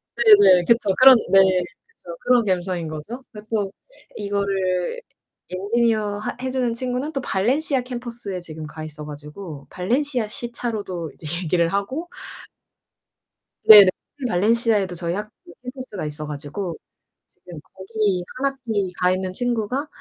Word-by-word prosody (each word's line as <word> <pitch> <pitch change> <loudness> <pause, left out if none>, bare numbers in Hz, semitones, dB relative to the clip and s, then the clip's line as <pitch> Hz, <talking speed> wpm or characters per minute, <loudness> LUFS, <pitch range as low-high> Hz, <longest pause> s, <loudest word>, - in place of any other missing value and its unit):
네네 205 -6 +7
그쵸. 230 -3 +3
그런 260 0 +9
네. 195 - +7
그래서 190 - -2
그런 245 -2 +4
감성 185 -2 -1
인 165 - -5
거죠. 155 - -7
그래 210 - -10
갖고 210 -2 -2 0.4
이거를 200 - -1 0.5
엔지니어 210 +2 0
하 210 - -4
해주는 255 -2 -1
친구는 255 +5 -3
또 275 - -2
발렌시아 260 +7 0
캠퍼스에 240 -6 -6
지금 160 -3 -8
가 155 +1 -8
있어 150 -1 -8
가지고 150 0 -9
발렌시아 245 +5 -1
시차로도 215 - -4
이제 155 - -10 0.2
얘기를 170 0 +2
하고. 200 - -3 1.6
네 210 -1 +12
네. - - +4 0.4
발렌시아에도 210 -1 +2
저희 170 0 -2
학교 210 +1 -5 0.3
캠퍼스가 250 - -6
있어 150 +1 -5
가지고. 150 +5 -5 0.5
지금 175 -3 -12
거기 195 -2 -1
1 275 +1 0
학기 220 -8 -3
가 180 0 +3
있는 185 0 -2
친구가 245 +5 -1
205 Hz, 300 characters per minute, -22 LUFS, 180-240 Hz, 1.6 s, 네